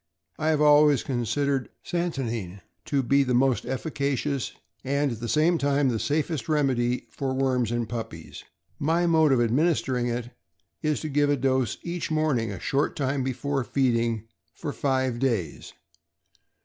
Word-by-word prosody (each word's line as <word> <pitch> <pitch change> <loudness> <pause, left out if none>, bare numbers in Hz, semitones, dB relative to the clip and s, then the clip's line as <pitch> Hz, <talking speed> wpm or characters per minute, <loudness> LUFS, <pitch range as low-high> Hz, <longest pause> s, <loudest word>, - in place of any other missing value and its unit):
1 155 - -2
have 155 -1 +2
always 150 -2 +5
considered 135 +2 -1 0.2
santonine 120 - -3 0.2
to 140 -2 0
be 140 +3 +3
the 125 -2 0
most 130 -1 +2
efficacious, 140 0 -2 0.3
and, 140 +1 0
at 115 - -5
the 120 0 -4
same 165 +2 +3
time, 140 -1 +2
the 115 -3 -1
safest 150 -1 -1
remedy 130 -5 +1
for 135 -2 -3
worms 130 -3 +1
in 120 0 0
puppies. 115 0 -7 0.4
My 165 +4 +2
mode 160 -3 +4
of 130 - +4
administering 125 0 +1
it 120 0 -3 0.5
is 155 -1 0
to 155 - -3
give 145 0 +2
a 145 - +2
dose 130 -3 0
each 175 0 -3
morning, 150 -8 +1
a 95 - -6
short 140 +2 0
time 140 -1 -1
before 135 +1 -1
feeding, 115 -3 0 0.3
for 145 - -5
five 130 -3 0
days. 115 - -2
135 Hz, 150 wpm, -26 LUFS, 120-145 Hz, 0.5 s, always